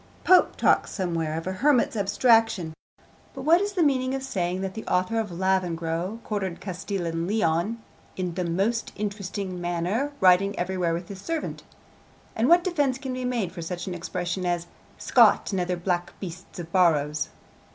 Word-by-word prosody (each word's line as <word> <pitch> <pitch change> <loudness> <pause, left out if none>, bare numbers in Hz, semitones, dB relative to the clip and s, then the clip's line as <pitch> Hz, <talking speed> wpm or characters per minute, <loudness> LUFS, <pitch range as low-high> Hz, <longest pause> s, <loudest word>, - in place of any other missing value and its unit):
Pope 370 -1 +5
talks - - +3
somewhere 165 -5 -2
of 165 - -5
a 185 - -2
hermit's 250 +5 +2
'abstraction,' 205 -4 +3 0.6
but - - -6
what 335 +4 +5
is 405 0 -2
the 360 -4 +2
meaning 260 -2 +1
of 270 - -4
saying 185 -7 -2
that 190 -1 -3
the 220 - -6
author 185 +5 +1
of 220 -2 -2
Lavengro 175 0 -1
quartered 195 -5 -3
Castile 190 0 -4
and 165 0 -2
Leon 200 +1 +1 0.4
'in 180 -2 -2
the 180 +1 -2
most 195 +7 0
interesting 200 -3 -4
manner, 175 +11 -1
riding 190 +2 +4
everywhere 180 -2 0
with 170 +1 -6
his 195 -2 -9
servant'? 325 +7 -3 0.7
And 225 +3 +2
what 345 +1 +6
defence 290 -8 +1
can 265 -1 -5
be 255 0 -3
made 235 -8 -1
for 180 - -8
such 175 +2 -5
an 185 - -4
expression 175 +1 -3
as 175 -1 -1 0.3
'Scott, - - +4
and 190 -2 0
other 180 0 -1
black 175 0 -2
beasts 185 -1 -8
of 170 -1 -7
Borrow's'? 155 -5 +2
190 Hz, 170 wpm, -26 LUFS, 175-225 Hz, 0.7 s, what